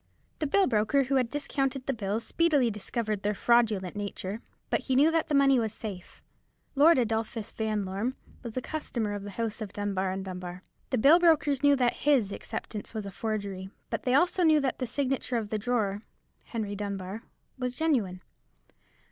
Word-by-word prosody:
The 305 - 0
bill 390 +7 +4
broker 225 +4 +2
who 265 0 +2
discounted 270 0 -2
the 270 - 0
bills 215 0 -2
speedily 290 -8 +2
discovered 210 0 -3
their 210 +1 0
fraudulent 215 -6 +2
nature; 205 +1 -4 0.3
but - - +3
he 260 - -1
knew 295 +5 +5
that 325 -1 +1
the 300 - 0
money 275 -2 +5
was 220 -2 -1
safe. 195 -5 -8 0.5
Lord 300 +3 +6
Adolphus 225 -2 -1
Vanlorme 215 +2 -2 0.3
was 235 -1 -7
a 255 - -1
customer 235 -9 -3
of 205 - -4
the 205 - -7
house 225 +2 -3
of 205 -3 -5
Dunbar 195 -2 -1
and 190 +1 -4
Dunbar; 180 -1 -7 0.3
the 255 - +1
bill 290 +9 +7
brokers 305 -5 +3
knew 285 -1 +5
that 250 -3 +1
his 265 -9 +2
acceptance 210 +2 -6
was 215 -2 -3
a 200 - -6
forgery; 200 -2 -4 0.2
but 230 -1 -1
they 250 - 0
knew - - +7
also 345 -2 +4
that 270 -3 -1
the 255 - -2
signature 265 -2 -1
of 215 -3 -3
the 215 - 0
drawer, 210 -3 0 0.4
Henry 215 -4 -4
Dunbar, 200 0 -4 0.4
was 250 -1 -2
genuine. 230 - 0
230 Hz, 180 wpm, -28 LUFS, 205-275 Hz, 0.5 s, bill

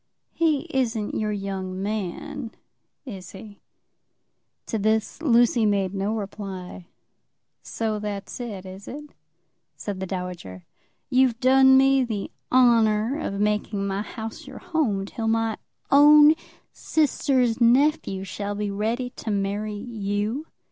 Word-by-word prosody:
"He 315 -4 +2
isn't 230 -5 -1
your 215 -1 -1
young 195 -2 -4
man; 220 +6 -4 0.5
is 190 -7 -9
he?" 205 +1 -12 1.0
To 225 - -2
this 220 +7 0
Lucy 240 -5 +4
made 200 -3 +1
no 200 +3 -1
reply. 195 -4 -7 0.7
"So 220 -2 -3
that's 205 0 -5
it, 210 -6 -6
is 190 +1 -10
it?" 295 +2 -9 0.6
said 200 -2 -5
the 190 - -4
dowager. 180 - -6 0.5
"You've 255 -2 +3
done 265 +1 +6
me 270 0 +4
the 215 -5 -4 0.2
honour 235 0 +4
of 200 -8 -3
making 210 -1 0
my 195 0 -2
house 220 +1 -7
your - - -9
home 300 - -1
till 225 +2 -4
my 225 -1 +1 0.3
own 295 +2 +8 0.4
sister's 260 -6 +1
nephew 250 -4 +3
shall 200 +2 -4
be 205 0 -2
ready 230 +5 -2
to - - -5
marry 205 +1 -2
you?" 215 +4 -3
215 Hz, 125 wpm, -24 LUFS, 200-255 Hz, 1.0 s, own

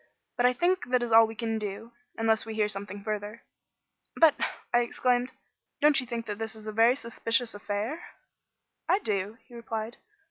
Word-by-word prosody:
But 245 0 +4
I 250 - +3
think 355 +3 +1
that 250 -1 +2
is 235 - -3
all 225 0 +8
we 225 - -8
can 225 0 -2
do, 210 +2 -6 0.3
unless 225 -1 +2
we 225 -1 -6
hear 215 -1 +2
something 200 -1 -5
further." 210 +1 -4 0.7
"But," 325 -3 +6 0.4
I 240 - +6
exclaimed, 245 +1 +1 0.5
"don't 295 -2 +5
you 250 - -8
think 230 -1 -4
that 210 0 -5
it 225 0 -4
is 215 -1 -12
a 215 - -4
very 230 +3 +5
suspicious 230 -1 0
affair?" 210 +10 -3 0.9
"I 375 - +5
do," 210 - -2
he 245 - -19
replied. 225 -1 -5
225 Hz, 180 wpm, -28 LUFS, 215-245 Hz, 0.9 s, all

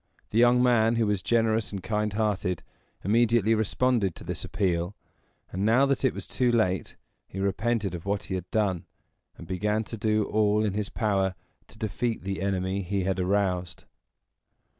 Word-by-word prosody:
The 110 - +2
young 120 +1 +5
man, 120 -2 +4
who 115 -1 +2
was 105 -2 0
generous 110 +3 +1
and 100 -3 -5
kind 105 +1 -1
hearted, 100 -5 -1 0.4
immediately 115 +1 +3
responded 110 -2 +1
to - - -9
this - - -4
appeal; 95 -1 -1 0.6
and, 95 +2 -2
now 115 +6 +4
that 140 -1 0
it 130 - +2
was - - -6
too 125 -1 +1
late, 95 -6 0 0.3
he 95 - -7
repented 100 0 0
of 85 -2 -6
what 100 0 -1
he - - -5
had 90 -1 -4
done, 100 -6 0 0.5
and - - -10
began 105 +5 -1
to 115 - -7
do 110 0 +1
all 105 0 +2
in 100 - -1
his 105 0 -2
power 95 -4 0 0.3
to - - -15
defeat 110 +2 -2
the 95 0 -3
enemy 95 0 -1
he 95 +1 -2
had 95 0 -1
aroused. 90 -2 0
105 Hz, 175 wpm, -27 LUFS, 95-110 Hz, 0.6 s, young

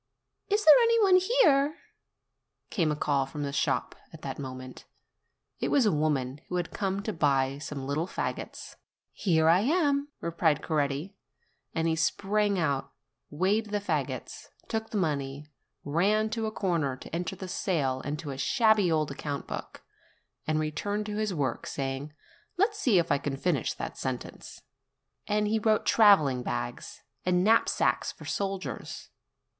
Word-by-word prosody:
"Is 420 +1 +1
there 310 - +11
any 460 0 +4
one 380 -2 +6
here?" 320 - +3 0.9
came 165 -7 +1
a - - 0
call 140 -2 0
from 145 +2 -5
the 140 -1 -3
shop - - 0 0.2
at - - -13
that - - -5
moment. 130 -1 -8 0.7
It - - 0
was 275 -5 +4
a 210 - +4
woman 145 -3 0
who 180 - -3
had 175 -2 -2
come 195 0 -2
to 215 - -3
buy 140 -4 +1
some 145 -2 -6
little 150 +5 -1
fagots. - - -5 0.3
"Here 160 -5 +2
I 170 +2 +6
am!" 285 - +2
replied 165 -3 +1
Coretti; 150 +4 -1 0.6
and 165 0 +1
he 160 - +2
sprang 200 +5 +1
out, 140 -6 -1 0.4
weighed 195 +8 +1
the 205 0 0
fagots, 205 - -3 0.2
took 220 -1 -3
the 215 - -3
money, 145 -4 -2 0.3
ran 205 +8 +1
to 225 -1 -1
a - - -3
corner 170 -10 0
to 160 - -8
enter 175 -1 -3
the 190 - -7
sale 150 -8 -1
in 145 +2 -3
a 135 -2 -4
shabby 220 - +3
old 155 -2 +1
account 140 0 -4
book, - - -7 0.6
and 155 0 +1
re 155 0 -1
turned 205 +6 -2
to 210 0 -4
his 215 -1 0
work, 140 -8 -2
saying, 135 +2 -4 0.5
"Let's 415 +3 +1
see 245 - +3
if 170 -2 +2
I 140 - +3
can 140 -1 -3
finish 145 -4 0
that - - -6
sentence." - - -6 0.6
And 210 0 +1
he 220 +1 +1
wrote, 215 0 +2
travelling 155 - +5
bags, - - -5 0.2
and 180 0 +2
knapsacks 225 +3 +2
for - - -13
soldiers. 195 -1 -4
170 Hz, 160 wpm, -28 LUFS, 145-215 Hz, 0.9 s, there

